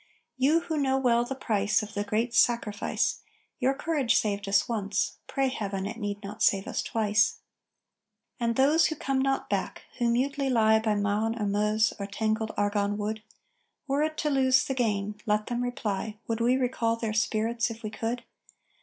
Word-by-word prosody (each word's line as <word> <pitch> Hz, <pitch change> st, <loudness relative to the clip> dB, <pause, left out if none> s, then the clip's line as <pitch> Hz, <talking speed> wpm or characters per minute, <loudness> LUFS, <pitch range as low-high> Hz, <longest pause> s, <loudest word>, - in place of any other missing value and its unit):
You 285 Hz, +6 st, +3 dB
who 325 Hz, -2 st, -3 dB
know 265 Hz, -2 st, +2 dB
well 240 Hz, -3 st, +3 dB
the 270 Hz, -, -4 dB
price 215 Hz, -4 st, +1 dB
Of 215 Hz, 0 st, -8 dB
the 205 Hz, -1 st, -1 dB
great 220 Hz, +4 st, -1 dB
sacrifice, 235 Hz, -3 st, +1 dB, 0.4 s
Your 265 Hz, +1 st, +2 dB
courage 290 Hz, -5 st, +1 dB
saved 200 Hz, -2 st, 0 dB
us 200 Hz, 0 st, +3 dB
once; 205 Hz, -3 st, -1 dB
pray 270 Hz, 0 st, 0 dB
Heaven, 200 Hz, -6 st, -3 dB
it 220 Hz, +3 st, -5 dB
need 205 Hz, -1 st, -4 dB
not 205 Hz, +2 st, -8 dB
save 195 Hz, -1 st, +3 dB
us -, -, -2 dB
twice. 215 Hz, -2 st, +1 dB, 1.0 s
And 230 Hz, -1 st, 0 dB
those 295 Hz, +6 st, +4 dB
who 315 Hz, -, -3 dB
come 270 Hz, -2 st, -1 dB
not 270 Hz, 0 st, 0 dB
back, -, -, -3 dB, 0.2 s
who 240 Hz, -1 st, +2 dB
mutely 275 Hz, +3 st, 0 dB
lie 220 Hz, -3 st, +4 dB
By 220 Hz, -1 st, 0 dB
Marne 210 Hz, +3 st, 0 dB
or 210 Hz, -, 0 dB
Meuse 210 Hz, +2 st, +2 dB
or 200 Hz, -, -3 dB
tangled 220 Hz, +2 st, -1 dB
Argonne 205 Hz, 0 st, 0 dB
wood: 215 Hz, +1 st, -3 dB, 0.7 s
Were 280 Hz, +1 st, +1 dB
it 310 Hz, 0 st, -1 dB
to 300 Hz, -, 0 dB
lose 260 Hz, -2 st, +4 dB
the 270 Hz, -, -2 dB
gain, 210 Hz, -4 st, -1 dB
(let 210 Hz, 0 st, +1 dB
them 240 Hz, 0 st, -2 dB
reply!) 220 Hz, -4 st, -3 dB
_Would 230 Hz, 0 st, -2 dB
we 245 Hz, +2 st, +3 dB
recall 240 Hz, -3 st, 0 dB
their 225 Hz, -2 st, -3 dB
spirits 230 Hz, +2 st, 0 dB
if 230 Hz, +1 st, -9 dB
we 215 Hz, -, -4 dB
could? 230 Hz, +3 st, -3 dB
225 Hz, 180 wpm, -28 LUFS, 210-260 Hz, 1.0 s, those